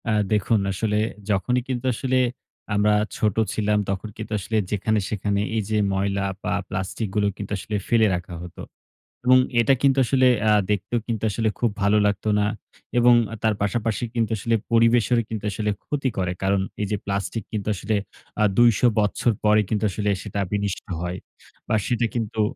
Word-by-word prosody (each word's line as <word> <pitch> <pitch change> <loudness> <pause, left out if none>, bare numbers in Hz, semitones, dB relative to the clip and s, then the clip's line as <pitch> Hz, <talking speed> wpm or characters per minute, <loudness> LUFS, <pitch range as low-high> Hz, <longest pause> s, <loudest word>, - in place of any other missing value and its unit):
অ্যা 110 -2 +1 0.2
দেখুন 105 +2 +2
আসলে 105 +2 -1 0.3
যখনই 125 +6 +1
কিন্তু 130 -1 -3
আসলে 130 +2 0 0.6
আমরা 105 +1 +3 0.2
ছোট 105 -3 +1 0.2
ছিলাম 105 -1 +1
তখন 100 +2 -3
কিন্তু - - -7
আসলে 110 +4 -2
যেখানে-সেখানে 105 -1 0
এই 110 - +1
যে 110 - +1 0.2
ময়লা 100 0 0 0.2
বা - - -1 0.2
প্লাস্টিক 95 +4 -3
গুলো 105 -1 +2
কিন্তু 100 -1 -7
আসলে 105 +2 -5
ফেলে 115 -2 +4
রাখা 90 0 -6
হত। 90 0 -11 0.7
এবং 130 +1 +7 0.2
এটা 115 +4 +4
কিন্তু 140 -1 +3
আসলে 130 +1 +3 0.2
অ্যা 110 -1 +4 0.2
দেখতেও 105 +4 0
কিন্তু 115 -3 -3
আসলে 110 +1 0
খুব 120 - +2
ভালো 100 +1 +4
লাগতো 100 +1 -1
না। 105 - +2 0.5
এবং 120 0 +6 0.3
তার 110 -1 +3
পাশাপাশি 110 +3 -1
কিন্তু 115 -1 0
আসলে 115 +3 0 0.2
পরিবেশের 115 +1 +4
কিন্তু 110 -2 -4
আসলে 105 +1 -1
ক্ষতি 140 -2 -1
করে, 90 -2 0
কারণ 95 0 +2 0.2
এই 105 - 0
যে 105 - +1
প্লাস্টিক 100 +2 -2
কিন্তু 105 -2 -4
আসলে 110 +3 -1 0.5
আ - - +5
২০০ 120 0 +5
বছর 105 +3 +1
পরে 105 0 +5
কিন্তু 105 -1 -1
আসলে 105 +2 -1
সেটা 105 -1 -5
বিনিষ্ট 100 -1 -2 0.2
হয়, 90 +1 -3 0.5
বা - - +1
সেটা 120 -1 +1
কিন্তু, 110 -2 -1
105 Hz, 170 wpm, -23 LUFS, 100-115 Hz, 0.7 s, এবং